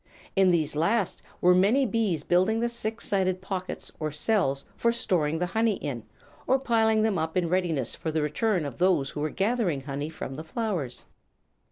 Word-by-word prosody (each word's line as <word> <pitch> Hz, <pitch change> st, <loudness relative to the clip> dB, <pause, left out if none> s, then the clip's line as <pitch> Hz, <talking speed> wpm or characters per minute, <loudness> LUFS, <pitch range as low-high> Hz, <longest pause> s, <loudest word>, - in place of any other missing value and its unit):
In 195 Hz, -2 st, +5 dB
these 155 Hz, -4 st, +1 dB
last 190 Hz, +6 st, +1 dB, 0.2 s
were 180 Hz, +1 st, +6 dB
many 210 Hz, +10 st, +4 dB
bees 205 Hz, -, 0 dB
building 185 Hz, +7 st, +2 dB
the 235 Hz, +1 st, +1 dB
six 225 Hz, -1 st, -4 dB
sided 185 Hz, -2 st, +1 dB
pockets 185 Hz, -1 st, -5 dB
or 155 Hz, -1 st, -1 dB
cells 150 Hz, -5 st, +1 dB
for 235 Hz, -, +2 dB
storing 165 Hz, -9 st, 0 dB
the 180 Hz, -, 0 dB
honey 220 Hz, +3 st, +1 dB
in, 125 Hz, -9 st, -4 dB, 0.5 s
or 265 Hz, -, +4 dB
piling 225 Hz, -4 st, +2 dB
them 215 Hz, -5 st, +1 dB
up 160 Hz, +2 st, -2 dB
in 175 Hz, -2 st, +2 dB
readiness 165 Hz, -8 st, 0 dB
for 160 Hz, -, -4 dB
the 155 Hz, -1 st, 0 dB
return 175 Hz, +3 st, 0 dB
of 140 Hz, -, -7 dB
those 175 Hz, -7 st, +2 dB
who -, -, -6 dB
were 155 Hz, +1 st, 0 dB
gathering 195 Hz, -, 0 dB
honey 140 Hz, +2 st, -4 dB
from 135 Hz, -4 st, -7 dB
the 155 Hz, -, -5 dB
flowers. 170 Hz, -, -3 dB
185 Hz, 185 wpm, -27 LUFS, 155-220 Hz, 0.5 s, were